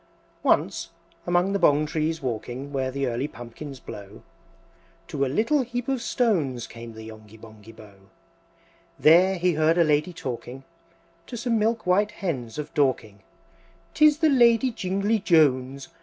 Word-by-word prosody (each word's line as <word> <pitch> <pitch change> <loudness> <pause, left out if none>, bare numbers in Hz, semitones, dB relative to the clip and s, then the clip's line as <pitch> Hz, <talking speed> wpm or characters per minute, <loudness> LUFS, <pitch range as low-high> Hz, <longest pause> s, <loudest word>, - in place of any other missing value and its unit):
II. - - -35 0.2
Once, - - +1 0.4
among 175 +3 +2
the 200 - 0
Bong 150 -3 +4
trees 155 +1 -2
walking 125 +3 -5
Where 130 -1 -1
the 140 +1 -2
early 125 +3 -2
pumpkins 130 +2 -10
blow, 100 -3 -11 0.9
To 140 -3 -1
a - - +1
little 225 - +1
heap 245 -1 -4
of 265 -3 -1
stones 160 - 0
Came 115 0 -10
the 110 0 -10
Yonghy 110 0 -13
Bonghy 110 -1 -14
Bò. 110 -2 -15 1.0
There 180 +5 +5
he 180 0 +1
heard 155 +2 +2
a 170 - +5
Lady 150 +3 +1
talking, 130 -3 -7 0.6
To 240 - -7
some 230 -1 0
milk 225 +1 0
white 195 +3 +2
Hens 130 - -4
of 150 - -6
Dorking, 125 -8 0 0.7
"'Tis 305 -1 +5
the 315 -1 +3
Lady 245 -2 +4
Jingly 200 +2 -1
Jones! 140 -7 +2
150 Hz, 155 wpm, -25 LUFS, 125-200 Hz, 1.0 s, There